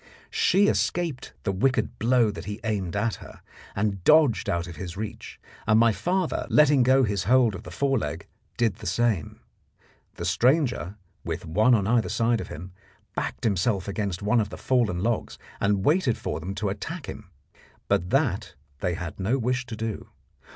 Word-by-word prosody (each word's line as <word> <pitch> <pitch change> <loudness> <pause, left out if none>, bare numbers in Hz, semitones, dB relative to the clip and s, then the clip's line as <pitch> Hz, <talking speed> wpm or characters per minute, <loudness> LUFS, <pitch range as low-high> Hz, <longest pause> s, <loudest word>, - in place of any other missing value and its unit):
She 200 +2 +3
escaped 165 -11 -1
the 100 - 0
wicked 125 +8 0
blow 120 -1 +3
that - - -8
he 105 +1 -5
aimed 100 -6 -2
at 105 +2 0
her, - - -13 0.3
and 100 -2 -1
dodged 150 - +4
out 85 0 0
of 85 -1 -9
his 85 +2 -7
reach, 105 0 -7 0.3
and 110 0 +5
my 115 0 +5
father, 175 - -1
letting 145 -3 +5
go 130 +2 +5
his 100 -6 -1
hold 120 -1 +4
of 95 - -7
the - - -10
fore 135 -2 +1
leg, 75 -2 -5 0.3
did 115 -4 +1
the 110 -2 -7
same. 110 -4 0 0.7
The 85 - -5
stranger, 120 - +1 0.3
with - - -4
one 110 +10 +4
on 100 -3 0
either 110 -3 +2
side 115 +2 +1
of - - -7
him, 90 +4 -8 0.4
backed - - -4
himself 100 -1 +1
against 100 -2 -3
one 110 +3 +3
of 105 - -3
the - - -8
fallen 110 -9 +1
logs 115 0 -1 0.2
and 100 -1 +1
waited 150 -7 +3
for - - -4
them 95 +5 -5
to 105 0 -1
attack 140 - -5
him. 110 -4 -9 0.6
But 90 - +1
that 110 - 0 0.2
they 90 +1 -1
had 85 -1 -6
no 110 +8 +1
wish 125 0 -1
to 115 - -5
do. 110 0 -5
110 Hz, 180 wpm, -26 LUFS, 95-125 Hz, 0.7 s, and